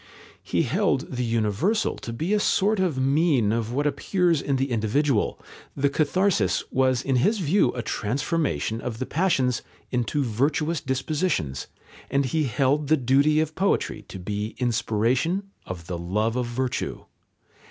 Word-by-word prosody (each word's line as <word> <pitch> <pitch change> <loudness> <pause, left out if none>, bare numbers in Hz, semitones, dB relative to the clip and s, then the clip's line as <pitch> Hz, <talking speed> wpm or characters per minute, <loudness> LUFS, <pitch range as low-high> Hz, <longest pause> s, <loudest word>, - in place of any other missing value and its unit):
He - - 0
held - - 0
the 125 -1 -2
universal 115 - +1
to 115 - -7
be 160 - -2
a 210 - +3
sort 205 +1 +2
of 180 -7 +1
mean 135 -4 +2
of 115 0 -1
what 145 +4 0
appears 165 +2 +1
in 140 - 0
the 135 0 -1
individual, 115 +2 +1 0.4
the 140 0 +2
catharsis 155 - +1
was 130 -1 +2
in 135 -2 +1
his 210 - +2
view 190 +2 +2
a 120 - -4
transformation 125 - -1
of 120 -3 -4
the 130 - -3
passions 135 - +1 0.3
into 125 +4 0
virtuous 145 +7 0
dispositions, 130 - -1 0.4
and 140 0 +1
he 155 +4 0
held 140 +3 +1
the 155 +2 +4
duty 140 +4 +3
of 155 0 -2
poetry 195 +5 0
to - - -8
be 105 +3 -4
inspiration 125 - 0 0.2
of 90 -3 -6
the 85 -1 -4
love 105 +7 -1
of 125 -1 -1
virtue. 125 +1 -3
130 Hz, 150 wpm, -25 LUFS, 115-155 Hz, 0.4 s, the